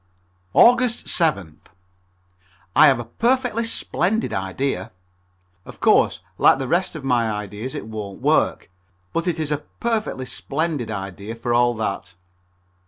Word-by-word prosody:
Aug. 245 0 +7
7th. 160 - 0 1.2
I 155 - +8
have 135 - +4
a 120 - -5
perfectly 235 - 0
splendid 220 -1 -1
idea. 95 +2 -2 0.7
Of - - -13
course, - - +3 0.2
like - - +6
the 135 -1 -4
rest 175 +4 0
of 155 - -7
my 120 -4 +1
ideas 105 +4 -5
it - - -5
won't 105 -3 -7
work, - - +1 0.4
but 165 +2 -1
it 170 -2 0
is 155 -1 -2
a 150 - +1 0.2
perfectly 220 - -1
splendid 145 0 -3
idea 100 +1 -6
for 120 +1 -2
all 120 0 +3
that. 100 -4 -4
130 Hz, 135 wpm, -22 LUFS, 105-170 Hz, 1.2 s, I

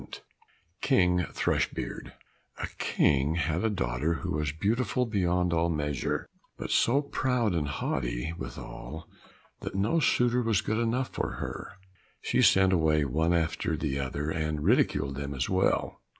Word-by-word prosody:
52 - - -10 0.6
King 90 -10 +3
Thrushbeard - - -2 0.4
A - - -3
King 70 +2 +2
had 85 +1 0
a 110 - +2
daughter 80 - -1
who - - -4
was 75 -1 -1
beautiful 115 - 0
beyond 90 -5 +1
all 85 0 +2
measure, 75 -4 -2 0.3
but - - -5
so 140 +5 +3
proud 125 -6 0
and 80 -4 0
haughty 65 +1 -2
withal 80 +2 -8 0.5
that - - -6
no 105 +13 +2
suitor 125 -4 +3
was 115 -4 +2
good 110 +1 -1
enough 120 +3 0
for - - -3
her. - - -6 0.5
She - - +1
sent 95 0 +5
away 80 -3 +3
one 80 +5 +1
after 80 -1 0
the 70 -3 -2
other, 70 +3 -2
and 75 -2 -2
ridiculed 70 -1 +2
them 70 0 -4
as 65 +5 -2
well. 95 0 +1
85 Hz, 150 wpm, -29 LUFS, 75-105 Hz, 0.6 s, sent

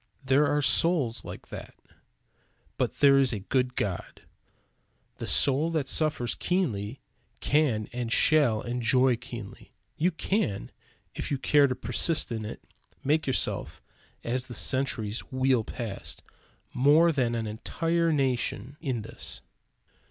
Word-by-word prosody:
There 135 +3 +4
are 145 0 +1
souls 140 -4 +2
like - - -10
that. - - -9 1.0
But - - 0
there 140 -1 +5
is 135 -2 +4
a 105 - -3
good 125 +5 -1
God. 95 -4 -4 0.9
The - - -6
soul 145 +4 +5
that 155 -5 -1
suffers 150 -4 +1
keenly 130 - -2 0.4
can 135 -8 +1
and 120 -1 -3
shall 135 -7 +4
enjoy 125 +1 +2
keenly. 120 -4 -10 0.2
You 170 +4 +2
can, 165 - -2 0.4
if - - -5
you 140 - 0
care 145 +1 +4
to 130 - -2
persist 150 +3 0
in 110 -2 -3
it, 105 - -8 0.4
make 155 +2 +1
yourself, 130 - -2 0.4
as 125 +2 -1
the 120 - -6
centuries 120 -5 0
wheel 130 -2 +2
past, 110 -2 -6 0.5
more 150 +6 +5
than 125 -6 0
an 115 -1 -2
entire 165 +10 -1
nation 135 -2 -1
in 130 -8 -2
this. 110 - -8
130 Hz, 130 wpm, -27 LUFS, 115-150 Hz, 1.0 s, there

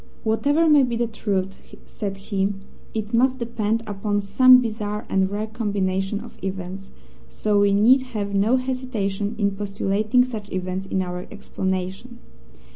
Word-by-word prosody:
"Whatever 285 +9 +2
may 300 -2 +6
be 245 -3 0
the 235 +1 +1
truth," 195 -4 -3 0.2
said 195 -2 -5
he, 195 0 -1 0.4
"it 215 0 -3
must 255 +2 +3
depend 230 -2 -1
upon 205 0 -1
some 250 +6 +6
bizarre 215 -3 -3
and 190 0 +2
rare 205 +2 -2
combination 200 -3 -2
of - - -13
events, 190 0 -5 0.4
so 205 - +1
we 200 0 +4
need 230 +7 +5 0.2
have 200 -1 -2
no 205 +5 +3
hesitation 235 -6 -2
in 200 -2 +1
postulating 205 +4 +1
such 220 -5 -7
events 185 +1 -3
in 190 -1 0
our 180 0 -6
explanation. 190 +3 -4
205 Hz, 145 wpm, -23 LUFS, 195-230 Hz, 0.4 s, may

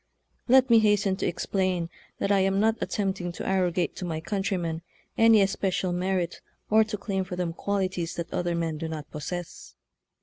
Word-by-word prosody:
Let 260 +1 +6
mehasten 210 -4 +4
to - - 0
explain 180 -1 -1 0.3
that 200 - 0
I 200 - +4
am 195 +1 +2
not 220 +1 +3
attempting 190 -3 -1
to - - -6
arrogate 180 -2 +1
to - - -5
my 160 -2 -2
countrymen 175 -2 -2 0.3
any 225 -2 +6
especial 190 -2 0
merit, 180 -1 -1 0.3
or 220 +1 +6
to 215 -1 -4
claim 195 -2 -2
for 185 -1 -6
them 175 -2 -2
qualities 185 -3 -2
that 170 - -5
other 175 -1 0
men 165 -2 -2
do 165 - -3
not 155 -2 -6
possess. 175 +3 -6
185 Hz, 170 wpm, -27 LUFS, 175-200 Hz, 0.3 s, Let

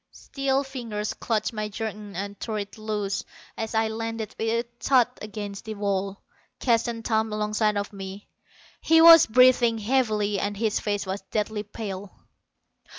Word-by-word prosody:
Steel 275 0 -1
fingers 230 -6 -4
clutched 220 -1 -1
my 215 -1 -3
jerkin 210 -2 -6
and 200 +2 -5
tore 220 -2 -3
it 205 -1 -5
loose 210 -2 -2 0.3
as 225 0 -4
I 220 0 +3
landed 225 -1 -4
with 230 +2 0
a - - -33
thud 255 -4 +4
against 205 -1 -6
the 220 -1 -5
wall. 200 -1 -2 0.4
Keston 230 -1 +1
thumped 220 -1 0
alongside 210 0 +1
of 205 +1 -3
me. 195 +1 -8 0.5
He 325 0 +5
was 330 -1 +9
breathing 245 -1 +5
heavily 215 -3 +1
and 205 0 -2
his 220 -1 0
face 205 -1 -2
was 190 +1 -4
deathly 215 0 -1
pale. 205 -2 -7
215 Hz, 150 wpm, -25 LUFS, 205-230 Hz, 0.5 s, was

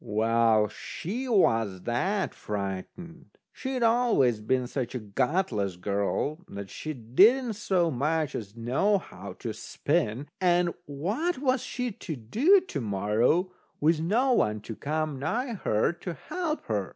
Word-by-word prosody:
Well, 110 0 +3
she 230 - -5
was 115 - +2
that 190 - 0
frightened, 105 - -6 0.2
she'd 260 -2 -3
always 225 - +3
been 125 +4 0
such 125 0 -4
a - - -1
gutless 110 - 0
girl, 100 - -1
that 100 -1 -8
she 155 - -5
didn't 210 - +4
so 185 -5 +1
much 150 +3 0
as 105 -1 -6
know 130 - +2
how 190 - -9
to - - -5
spin, 145 -5 -1 0.2
and 175 -1 +3
what 205 - -1
was 260 -2 +1
she 250 -1 -3
to 170 -5 -6
do 250 - +4
to 355 - -5
morrow 110 - +1 0.3
with 155 +1 +3
no 240 +10 +2
one 105 - +1
to 110 +1 -7
come 155 0 -2
nigh 235 - -1
her 110 - +1
to 175 0 -6
help 325 - -3
her? 105 -4 -1
150 Hz, 140 wpm, -28 LUFS, -, 0.3 s, didn't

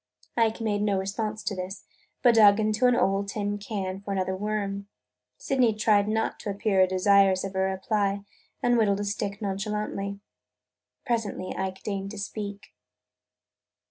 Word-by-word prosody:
Ike 225 -2 +2
made 210 -2 0
no 205 -2 +1
response 210 +3 -3
to 205 - -2
this 185 +2 -6 0.4
but 245 -2 +7
dug 210 -2 +7
into 215 +3 +2
an 250 - +4
old 195 -2 +1
tin 205 0 -2
can 195 -2 -4
for 200 - -6
another 190 -1 -1
worm. 200 0 -3 0.5
Sydney 250 -5 +2
tried 210 -1 +3
not 220 +1 -1
to - - -5
appear 195 -2 +2
desirous 190 0 +4
of 195 0 -4
a 190 - -2
reply 195 +1 0 0.4
and 245 -1 +4
whittled 200 -2 +2
a - - -2
stick 200 0 -3
nonchalantly. 200 0 -3 0.9
Presently 225 -6 -2
Ike 190 0 -4
deigned 195 -2 -3
to 215 - -8
speak. 200 0 -6
200 Hz, 150 wpm, -27 LUFS, 195-215 Hz, 0.9 s, but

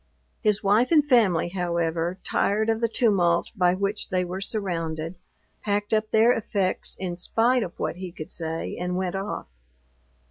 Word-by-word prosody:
His 210 -2 +1
wife 210 +7 +3
and 300 -3 +5
family, 210 - +3
however, 170 -1 -1
tired 220 +2 +1
of 225 +1 -2
the 230 - +3
tumult 190 -7 +2
by 180 -2 +3
which 200 +2 -2
they 185 -1 0
were 185 +2 -5
surrounded, 165 -6 -3 0.5
packed 205 0 -1
up 215 0 +1
their 225 +2 +5
effects 200 -4 -2
in 180 -2 -3
spite 235 +7 +2
of 175 -5 -5
what - - -2
he 185 -1 -6
could 155 -3 -8
say, 165 -1 -3
and 180 0 -2
went 185 -1 -1
off. 195 +1 -4
190 Hz, 165 wpm, -25 LUFS, 175-215 Hz, 0.5 s, and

